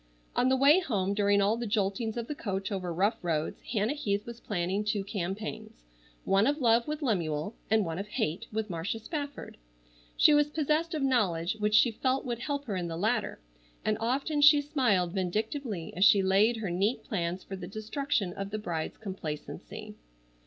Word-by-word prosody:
On 255 - +3
the 265 - +4
way 285 +6 +6
home, 200 - -1
during 200 0 +3
all 210 +3 +2
the 235 -1 -3
joltings 210 +2 -1
of 235 - -2
the 295 - -4
coach 195 -6 -3
over 185 -3 -3
rough 200 +7 +1
roads 160 -3 -2
Hannah 215 +2 -1
Heath 205 -8 -2
was 235 0 -8
planning 190 0 -1
two 205 -1 -1
campaigns, 195 - -5 0.4
one 195 +4 +3
of 290 +1 +2
love 235 -2 +3
with 300 0 -3
Lemuel, 170 - -1 0.2
and 220 -2 +3
one 165 +1 -3
of 200 - -4
hate 210 - -2
with 220 0 -2
Marcia 175 +3 -3
Spafford. 285 +4 -6 0.6
She 300 - +7
was 295 0 +4
possessed 310 +2 0
of 300 - -1
knowledge 210 -7 +1
which 210 0 +2
she 235 +2 +6
felt 260 +4 0
would 240 -2 -3
help 285 +2 -3
her 205 - -3
in 180 -2 -2
the 165 -1 -4
latter, 220 - 0 0.5
and 215 - +2
often 275 +6 0
she 295 0 +8
smiled 250 - +1
vindictively 210 - -2
as 185 - +2
she 200 -1 +6
laid 200 +5 +3
her 205 -5 -3
neat 200 +7 0
plans 180 -4 -3
for 195 - -7
the 180 -2 -7
destruction 215 0 -2
of 195 +1 -5
the 215 - -3
bride's 170 -6 -4
complacency. 185 -8 -7
210 Hz, 190 wpm, -29 LUFS, 190-250 Hz, 0.6 s, she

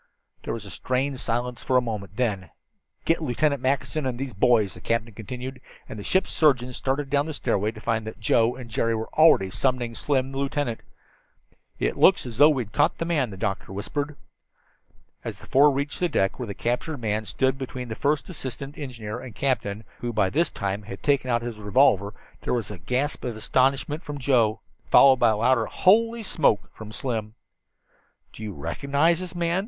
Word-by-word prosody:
There - - -4
was 110 -2 -7
a 100 - -9
strained 130 +3 -1
silence 120 +1 -2
for 130 - +2
a - - +7
moment. 105 -5 -5
Then 105 -7 -1 0.6
"Get 165 - +2
Lieutenant 140 0 0
Mackinson 135 +2 0
and 125 -2 -3
those 135 -1 -4
boys," 110 -2 +3
the - - -12
captain 115 0 -1
continued, 125 +5 -7 0.3
and 110 - -8
the - - -6
ship's 190 - +1
surgeon 130 -5 +2
started 135 +3 -1
down 145 +1 +2
the 155 - -4
stairway 105 -6 0
to 110 0 -8
find 110 -1 -1
that 110 - -7
Joe 115 +1 +2
and 125 -2 -9
Jerry 115 0 0
already 110 +1 +4
were 95 - -7
summoning 125 0 0
Slim 130 +2 0
and 135 - -9
the 135 - -3
lieutenant. 140 -4 -1 1.0
"It - - -1
looks - - +5
as 115 -3 -6
though 145 +1 +9
we'd 125 -9 -1
caught 145 +8 +2
the 165 - -2
man," 150 -8 +1
the 95 - -9
doctor 100 -2 -3
whispered. 145 +9 -3 1.1
As - - -5
the - - -14
four 145 +3 +5
reached 140 +1 -2
the 180 - +1
deck 95 -7 0
where 125 - -4
the 100 - -5
captured 125 +8 -2
man 110 -2 -2
stood 130 +6 0
between 125 -1 -5
the 110 - -4
first 145 +5 0
assistant 140 -3 -7
engineer 115 -5 -6
and 120 -4 -10
the - - -15
captain, 110 -6 -1 0.2
who 120 - -4
had 120 - -4
by 100 -3 +3
this 165 +4 +2
time 100 +1 -3 0.2
taken 140 -3 +2
out 120 -1 +1
his 120 -3 -5
revolver, 105 -2 +3 0.3
there - - -1
was 115 -3 -3
a 100 - -8
gasp 130 - -1
of 120 -3 -3
astonishment 135 +6 +1
from 145 -3 -6
Joe, 120 -5 +2 0.3
followed 135 -1 +7
by 120 -2 +4
a 110 - +1
louder 115 0 +2
"Holy 230 +4 +3
smoke!" 150 - +1
from 110 -1 -10
Slim. 110 -3 -4 1.0
"Do - - -12
you 105 -2 -5
recognize 140 - +1
this 185 -1 -6
man?" 170 +1 +1
125 Hz, 200 wpm, -25 LUFS, 110-140 Hz, 1.1 s, though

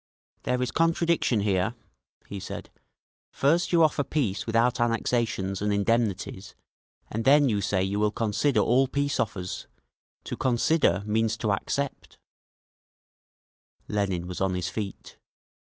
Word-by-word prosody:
"There 125 0 +1
is 125 - -2
contradiction 165 -8 +2
here," 100 +2 0 0.5
he 100 - -7
said. - - -7 0.6
"First 165 +6 +2
you 170 -2 +5
offer 150 -2 +2
peace 120 -11 -2
without 115 +2 +2
annexations 115 -4 0
and 105 0 0
indemnities, 100 -2 -1 0.6
and 115 +1 -2
then 140 +2 +5
you 105 -3 0
say 100 -1 0
you 100 +2 -1
will 105 0 +3
consider 110 +3 +1
all 130 +5 +3
peace 140 +1 -1
offers. 90 -4 -3 0.6
To - - -5
consider 130 - +2
means 110 +1 0
to 110 - -1
accept…." 140 +7 -3 1.7
Lenin 95 -4 -1
was 90 +1 -6
on 95 -1 +1
his 90 0 -2
feet. 100 -3 -6
110 Hz, 130 wpm, -26 LUFS, 100-130 Hz, 1.7 s, you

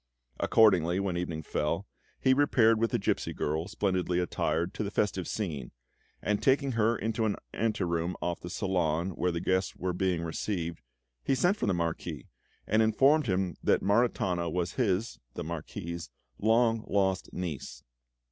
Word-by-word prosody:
Accordingly, 95 -5 +4
when 95 -2 -1
evening 85 -2 -3
fell, 80 +6 -1 0.3
he 130 - +4
repaired 120 -5 +4
with 115 0 +2
the - - +1
gipsy - - -1
girl, 80 +3 -1
splendidly 95 -3 0
attired, 85 -1 -1
to - - -3
the 100 - -2
festive 100 -3 -1
scene, 75 - -3 0.5
and 105 -1 0
taking 135 0 +3
her 115 0 +2
into 110 +2 -1
an 105 - +1 0.2
ante 110 -3 0
room 85 0 -1
off 85 -1 -2
the 90 - -7
salon 90 -2 0
where 90 +1 0
the 85 - -2
guests 95 +2 0
were 90 0 -2
being 90 -2 0
received, 85 -1 -3 0.4
he 135 - +2
sent 175 +9 +3
for 210 - -2
the 100 - +2
Marquis, 85 -1 -3 0.4
and 110 +2 +3
informed 135 +7 +4
him 95 -3 0
that - - +3
Maritana 100 -5 +1
was 85 +1 -1
his 110 -3 0 0.2
(the - - -4
Marquis's) 85 +1 -5 0.3
long 115 +1 +3
lost 95 -2 0
niece. 85 -7 -5
95 Hz, 160 wpm, -29 LUFS, 85-110 Hz, 0.5 s, Accordingly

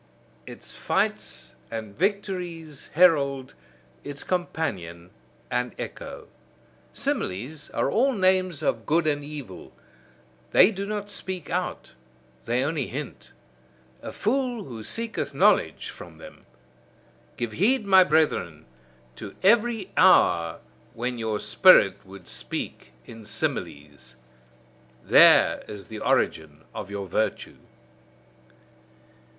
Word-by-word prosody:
Its - - -8
fights' - - -2 0.2
and 110 -3 -6
victories' 180 -5 -3
herald, 140 -6 +3 0.5
its 145 0 -6
companion 95 - -3 0.4
and 125 -1 -1
echo. - - -8 0.6
Similes, 130 +11 -3
are - - -1
all 265 +4 +2
names 185 - +1
of 115 -6 -1
good 165 +2 +2
and 145 -1 0
evil; 145 -11 -9 0.8
they 215 - +7
do 200 -1 -5
not 205 -1 -4
speak 185 -5 -4
out, - - -3 0.5
they 120 +3 +1
only 145 -2 -1
hint. 140 0 -7 0.7
A - - -7
fool 245 -1 -1
who 115 - -8
seeketh 230 - -3
knowledge - - +2
from - - -12
them! - - -14 0.9
Give 120 -2 -3
heed, 215 - +2
my 190 -1 +7
brethren, 150 - 0 0.5
to 100 - -9
every 225 -1 +3
hour 85 - +4 0.3
when 120 +1 -3
your 110 -2 -2
spirit 105 - +5
would 95 -2 -13
speak 65 - -5
in 115 -1 -11
similes: 75 - -4 0.9
there - - +6
is 100 -2 -9
the 110 - -7
origin 80 -5 0
of - - -6
your 100 -1 -5
virtue. 110 +5 -2
145 Hz, 110 wpm, -25 LUFS, -, 0.9 s, they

